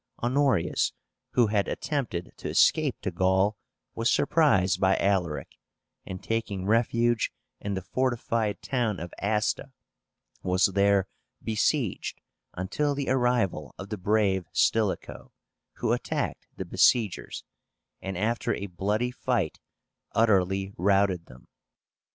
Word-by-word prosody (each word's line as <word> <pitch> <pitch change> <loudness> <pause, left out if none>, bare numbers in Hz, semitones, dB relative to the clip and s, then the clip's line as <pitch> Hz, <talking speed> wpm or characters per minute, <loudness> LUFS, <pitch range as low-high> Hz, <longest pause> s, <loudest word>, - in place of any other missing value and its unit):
Honorius, 130 - +2 0.4
who 120 - +5
had 105 -2 +1
attempted 120 - -3
to - - -5
escape 150 -5 +3
to 95 - -2
Gaul, 95 +4 +2 0.4
was 115 +1 0
surprised 100 - +3
by 95 0 +4
Alaric, 90 -6 0 0.6
and, 95 -1 -7
taking 105 -4 -2
refuge 115 +2 +2 0.3
in 100 -1 -3
the 95 - -4
fortified 115 -1 -1
town 120 -7 -1
of 85 +2 -7
Asta, 105 +1 0 0.7
was 90 +1 +2
there 100 -1 +3 0.4
besieged 110 - 0 0.4
until 140 +11 -1
the 140 -1 -2
arrival 120 - +1
of 100 - -8
the 105 - -3
brave 100 -2 +1
Stilicho, 110 -4 0 0.4
who - - 0
attacked - - -3
the - - -4
besiegers, 110 -6 +2 0.6
and 95 -1 -4
after 115 +5 0
a 100 - -5
bloody 105 +6 -1
fight 120 -9 -1 0.5
utterly 95 -3 +2
routed 95 -2 +2
them. 60 -1 -16
100 Hz, 115 wpm, -27 LUFS, 95-120 Hz, 0.7 s, who